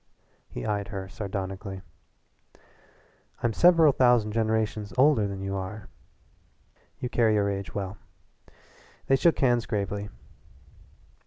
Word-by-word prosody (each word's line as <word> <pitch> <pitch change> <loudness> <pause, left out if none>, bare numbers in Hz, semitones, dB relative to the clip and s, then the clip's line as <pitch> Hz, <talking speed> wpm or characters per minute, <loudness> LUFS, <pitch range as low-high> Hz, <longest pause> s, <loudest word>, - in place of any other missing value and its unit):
He - - -6
eyed 105 -1 -2
her 95 -3 -6
sardonically. 95 0 -5 1.6
"I'm 120 -2 +1
several 165 -1 +6
thousand 120 -4 +3
generations 110 -2 -1
older 130 -6 +4
than 100 -1 -6
you 95 0 -3
are." 95 +2 -6 1.1
"You 125 - -4
carry 115 -3 +2
your 100 -1 +1
age 100 -2 -6
well." 100 0 -4 1.1
They 135 - +4
shook 165 +5 +3
hands 120 -3 +2
gravely. 105 -1 -3
105 Hz, 110 wpm, -27 LUFS, 100-120 Hz, 1.6 s, several